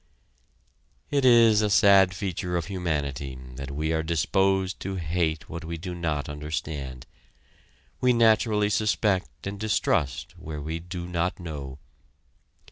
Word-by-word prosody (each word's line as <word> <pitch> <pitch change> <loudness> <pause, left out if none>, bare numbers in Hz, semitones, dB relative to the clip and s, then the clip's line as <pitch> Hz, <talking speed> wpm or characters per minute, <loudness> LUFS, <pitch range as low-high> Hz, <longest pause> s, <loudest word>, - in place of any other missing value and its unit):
It 140 -2 +2
is 115 -3 +6
a 105 - +1
sad 95 -2 +5
feature 90 -1 -2
of 85 - -2
humanity 75 -8 -3 0.2
that 70 0 -6
we 75 +3 -2
are 80 - +1
disposed 95 +4 +1
to 95 0 -4
hate 80 -2 -1
what 85 +1 -7
we 85 0 -5
do 90 +2 -6
not 80 -5 -2
understand; 75 -3 -5 0.9
we 125 - +4
naturally 110 -3 +3
suspect 105 -3 0
and 100 +1 -5
distrust 75 - 0
where 75 -1 -6
we 80 +3 -4
do 90 0 -6
not 90 +1 -1
know. 70 -6 -6
85 Hz, 130 wpm, -26 LUFS, 75-100 Hz, 0.9 s, is